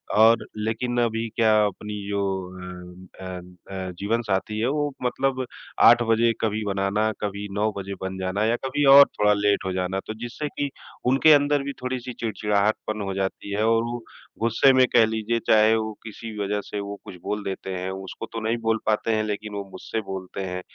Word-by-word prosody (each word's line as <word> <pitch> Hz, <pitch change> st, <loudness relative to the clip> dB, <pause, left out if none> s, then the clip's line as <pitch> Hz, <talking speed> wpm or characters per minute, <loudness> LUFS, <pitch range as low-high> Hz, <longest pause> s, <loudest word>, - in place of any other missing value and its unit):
और 110 Hz, +2 st, +5 dB
लेकिन 115 Hz, +3 st, -2 dB
अभी 115 Hz, -1 st, 0 dB
क्या 110 Hz, -1 st, +4 dB
अपनी 105 Hz, +1 st, -4 dB, 0.2 s
जो 100 Hz, 0 st, 0 dB, 0.3 s
अ 90 Hz, 0 st, -10 dB
अ 90 Hz, -1 st, -6 dB, 0.3 s
अ, 95 Hz, -1 st, -4 dB
जीवनसाथी 105 Hz, -1 st, -1 dB
है 115 Hz, -, +1 dB
वो 145 Hz, 0 st, 0 dB
मतलब 130 Hz, +1 st, 0 dB, 0.4 s
8 120 Hz, +1 st, +8 dB
बजे 115 Hz, +1 st, +4 dB
कभी 110 Hz, -1 st, 0 dB
बनाना, 100 Hz, +2 st, 0 dB
कभी 100 Hz, 0 st, -3 dB
9 105 Hz, +2 st, +1 dB
बजे 100 Hz, 0 st, -5 dB
बन 95 Hz, 0 st, -4 dB
जाना 95 Hz, +3 st, -1 dB
या 115 Hz, +2 st, +2 dB
कभी 145 Hz, +2 st, 0 dB
और 140 Hz, 0 st, +11 dB
थोड़ा 105 Hz, 0 st, +5 dB
लेट 100 Hz, -1 st, +1 dB
हो 95 Hz, -, -1 dB
जाना। 95 Hz, +1 st, -1 dB
तो 110 Hz, -, -3 dB
जिससे 120 Hz, +6 st, -4 dB
कि 145 Hz, 0 st, -3 dB, 0.4 s
उनके 145 Hz, +4 st, +6 dB
अंदर 145 Hz, -1 st, +3 dB
भी 140 Hz, 0 st, -4 dB
थोड़ी-सी 125 Hz, -1 st, -4 dB
चिड़चिड़ाहटपन 105 Hz, -1 st, -1 dB
हो 95 Hz, -, -3 dB
जाती 95 Hz, +1 st, -3 dB
है 105 Hz, -, +1 dB
और 115 Hz, 0 st, +3 dB
वो 120 Hz, 0 st, -4 dB, 0.4 s
गुस्से 115 Hz, +4 st, +4 dB
में 130 Hz, 0 st, +6 dB
कह 115 Hz, -, +7 dB
लीजिए, 110 Hz, +1 st, -1 dB
चाहे 110 Hz, 0 st, +5 dB
वो 110 Hz, -1 st, -2 dB
किसी 110 Hz, 0 st, -8 dB
वज़ह 105 Hz, 0 st, -1 dB
से 105 Hz, -, -5 dB
वो 100 Hz, 0 st, -6 dB
कुछ -, -, -9 dB
बोल 105 Hz, 0 st, -3 dB
देते 95 Hz, 0 st, -4 dB
हैं, 90 Hz, +1 st, -3 dB, 0.2 s
उसको -, -, -7 dB
तो 115 Hz, -, -2 dB
नहीं 115 Hz, +2 st, +1 dB
बोल 115 Hz, 0 st, +1 dB
पाते 110 Hz, +1 st, +1 dB
हैं 110 Hz, -, +1 dB
लेकिन 105 Hz, 0 st, -4 dB
वो 100 Hz, 0 st, -3 dB
मुझसे 110 Hz, +4 st, -4 dB
बोलते 95 Hz, -2 st, -6 dB
हैं। 90 Hz, 0 st, -4 dB
110 Hz, 195 wpm, -24 LUFS, 100-115 Hz, 0.4 s, और